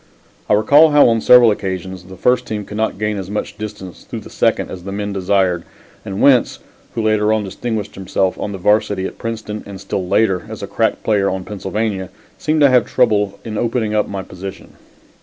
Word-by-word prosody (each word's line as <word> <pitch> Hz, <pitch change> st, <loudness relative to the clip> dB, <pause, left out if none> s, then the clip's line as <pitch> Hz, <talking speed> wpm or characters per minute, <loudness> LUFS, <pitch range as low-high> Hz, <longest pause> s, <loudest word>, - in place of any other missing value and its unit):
I -, -, +4 dB
recall 145 Hz, +9 st, +6 dB
how 145 Hz, -1 st, +6 dB
on 115 Hz, -1 st, +1 dB
several 120 Hz, -1 st, +7 dB
occasions 95 Hz, -2 st, -4 dB
the 95 Hz, +1 st, -11 dB
first 125 Hz, +5 st, +2 dB
team 105 Hz, -2 st, -4 dB
could 105 Hz, -, -9 dB
not 110 Hz, -3 st, -1 dB
gain 105 Hz, 0 st, -1 dB
as 95 Hz, -1 st, -6 dB
much 105 Hz, +1 st, -4 dB
distance 105 Hz, -5 st, -8 dB
through -, -, -7 dB
the -, -, -13 dB
second -, -, 0 dB
as 90 Hz, -2 st, -8 dB
the 100 Hz, -, -6 dB
men 100 Hz, 0 st, -3 dB
desired, 95 Hz, -2 st, +1 dB, 0.4 s
and 95 Hz, +1 st, -5 dB
Wentz, 130 Hz, -4 st, +4 dB, 0.4 s
who 115 Hz, -, -1 dB
later 110 Hz, -1 st, +2 dB
on 110 Hz, -1 st, +1 dB
distinguished 105 Hz, +2 st, -4 dB
himself 95 Hz, 0 st, -1 dB
on 105 Hz, -, -3 dB
the 100 Hz, -, -5 dB
Varsity 100 Hz, 0 st, +1 dB
at -, -, -7 dB
Princeton 110 Hz, -2 st, -5 dB
and 100 Hz, -1 st, -8 dB
still 95 Hz, -1 st, -3 dB
later 100 Hz, -1 st, +1 dB
as 110 Hz, -2 st, -7 dB
a -, -, -4 dB
crack 110 Hz, +3 st, 0 dB
player 100 Hz, -3 st, +2 dB
on 95 Hz, 0 st, -3 dB
Pennsylvania, 100 Hz, -1 st, -3 dB, 0.3 s
seemed 155 Hz, 0 st, +1 dB
to 140 Hz, -, +7 dB
have 125 Hz, -3 st, +4 dB
trouble 100 Hz, -2 st, +1 dB
in 110 Hz, -2 st, -4 dB
opening 115 Hz, -2 st, -1 dB
up 105 Hz, -1 st, +1 dB
my 100 Hz, -1 st, -5 dB
position. 95 Hz, +1 st, -9 dB
105 Hz, 205 wpm, -18 LUFS, 95-110 Hz, 0.4 s, several